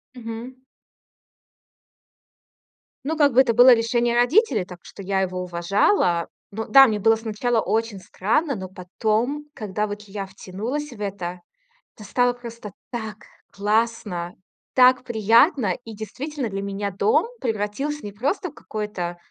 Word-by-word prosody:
Мгм. 235 +1 -7 2.5
Ну, 320 - 0
как 290 -3 +4
бы 255 - +7
это 245 -3 +2
было 245 +3 +8
решение 235 0 +2
родителей, 245 - +3
так 180 -2 -11
что 200 - -11
я 190 0 0
его 185 -1 -2
уважала. 175 0 +1 0.2
Но 220 +2 -4
да, 270 -1 +8
мне 215 -3 -1
было 225 +2 +4
сначала 225 +1 -1
очень 225 -2 -1
странно, 245 - 0
но 190 -2 -6
потом, 215 +10 -2
когда 210 -3 -3
вот 205 0 -6
я 195 0 -5
втянулась 210 +10 -5
в 235 - -12
это, 185 -3 -4 0.6
то 215 - -12
стало 245 +4 +1
просто 235 -3 -9 0.2
так 220 -3 -5 0.3
классно, 205 -4 -1 0.4
так 255 0 +6
приятно! 230 - +3
И 225 -2 -9
действительно, 255 +5 -5
для 195 -1 -4
меня 200 0 -3
дом 435 - +2 0.2
превратился 235 +6 -2
не 205 - -5
просто 285 - -2
в - - -18
какое-то 210 -9 -5
220 Hz, 140 wpm, -23 LUFS, 200-245 Hz, 2.5 s, было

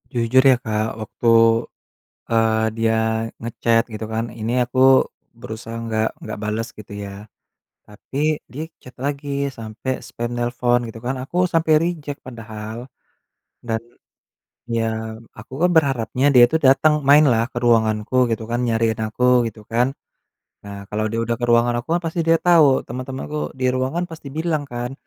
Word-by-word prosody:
Jujur 120 +3 +3
ya - - +5
Kak, 110 0 -1
waktu, 115 +2 -4 1.0
eee, 110 -1 +2 0.2
dia 115 0 +2 0.4
nge-chat 115 0 +1
gitu 110 - -5
kan, 115 +1 0 0.2
ini 115 +2 -2
aku 130 +2 -2 0.6
berusaha 115 +1 -7
nggak 110 0 0
nggak 110 -1 -6
bales 110 +2 -2
gitu 105 -1 -11
ya. 100 0 -7 0.7
Tapi 135 +7 -6 0.3
dia 155 +5 -4 0.2
chat 125 - -13
lagi 140 0 -3 0.2
sampai 115 +4 -4
spam 120 0 -5
nelpon 120 0 +1
gitu 115 0 -9
kan, 130 +1 -1
aku 175 +6 -4
sampai 160 -1 +2
reject 155 -5 -3
padahal. 110 -2 -8 0.9
Dan, 110 0 0 1.0
ya 110 0 -2 0.2
aku 115 +4 -12
kan 180 - +5
berharapnya 135 -3 +1
dia 120 - +9
tuh 160 - +2
datang, 150 +3 +5 0.2
mainlah 135 -6 +6
ke - - -8
ruanganku 110 0 +2
gitu 110 0 -2
kan, 120 - 0
nyariin 115 -1 +1
aku 120 +3 -4 0.2
gitu 110 -1 -9
kan. 120 +2 +3 0.8
Nah, 100 0 -8
kalau 110 +1 -1
dia 115 - -3
udah 115 0 -1
ke - - +1
ruangan 120 +1 +4
aku 120 - -10
kan 175 - +1
pasti 165 +1 -1
dia 165 0 +4
tau, 160 -7 +5
temen-temanku 130 +4 -5 0.2
di 130 - 0
ruangan 130 +8 -1
pasti 160 -3 -10
bilang 160 -2 -1
kan, 120 +2 -4
120 Hz, 155 wpm, -21 LUFS, 110-135 Hz, 1.0 s, dia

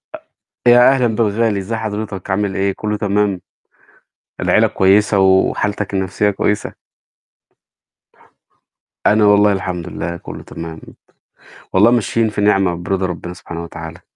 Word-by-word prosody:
أ - - -8 0.5
يا 120 0 +7
أهلًا 125 -2 +1
بالغالي، 110 -1 +1
إزّي 100 +4 -4
حضرتك 105 -3 -5
عامل 100 0 -1
إيه 95 0 0
كلّه 105 0 -2
تمام؟ 105 -2 0 1.0
العيلة - - +3
كويسة 100 +1 +3
وحالتك 95 +2 +1
النفسية 95 +2 0
كويسة؟ 105 +1 -2 2.3
أنا 105 0 +4
والله 105 0 +5
الحمد 90 -3 -4
لله 85 0 -5
كلّه - - -10
تمام. 80 -1 -8 0.9
والله 105 +5 +5
ماشيين 115 -1 +1
في 105 - -4
نعمة 95 -3 +2
وبرضى 95 +2 -2
ربّنا 90 0 -5
سبحانه 85 -1 -8
وتعالى. 85 0 -9
100 Hz, 125 wpm, -17 LUFS, 95-105 Hz, 2.3 s, يا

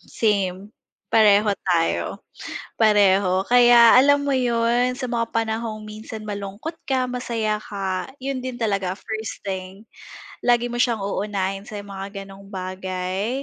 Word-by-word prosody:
Same. 200 -3 -1 0.4
Pareho 210 -1 +5 0.2
tayo, 170 -3 0 0.6
pareho. 200 -3 +4
Kaya 240 -1 +7
alam 285 +2 +5
mo 285 - -1
’yon, 245 -1 +2
sa 255 0 -5
mga 230 -1 -2
panahong 225 -1 -2
minsan 215 +1 -8
malungkot 205 - -6
ka, 255 -2 0
masaya 230 -4 -1
ka, 195 -3 -4 0.2
'yon 270 0 -2
din 255 -1 -4
talaga 195 -4 0
first 220 +3 -6
thing. 190 +2 -6 0.5
Lagi 240 0 +2
mo 240 - -4
siyang 235 -4 +1
uunahin 195 0 -2
sa 210 -2 -7
mga 195 0 -7
gano'ng 195 0 -13
bagay 185 +4 -3
215 Hz, 130 wpm, -23 LUFS, 195-240 Hz, 0.6 s, Kaya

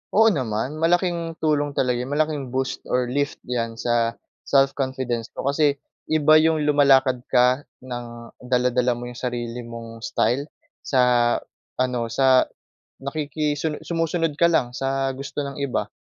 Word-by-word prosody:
Oo 220 +1 +6
naman, 130 - -2
malaking 170 0 +1
tulong 145 -2 +1
talaga 125 -2 +1
yu 125 - -4
malaking 145 -2 -1
boost 130 +1 -2
or 125 -1 0
lift 140 +1 0
'yan 115 -2 -3
sa 115 0 0 0.3
self-confidence 130 -4 +1
ko. - - -5
Kasi, 140 +1 +2 0.3
iba 155 0 +5
'yong 160 -1 +2
lumalakad 135 -3 +4
ka 125 +3 +3 0.2
nang 120 -2 -8
dala-dala 125 -1 +1
mo 120 - -7
'yong 120 - -10
sarili 120 -1 -3
mong 115 -1 -9
style, 135 +5 0 0.3
sa 125 -2 +3 0.4
ano 125 -2 0
sa 130 +2 +4 0.5
nakikisuno 150 +1 -2
sumusunod 165 -2 -1
ka 170 - +4
lang 160 -8 +2
sa 135 0 0
gusto 140 +1 -4
ng 140 0 -6
iba 140 -3 -2
135 Hz, 140 wpm, -23 LUFS, 125-150 Hz, 0.5 s, Oo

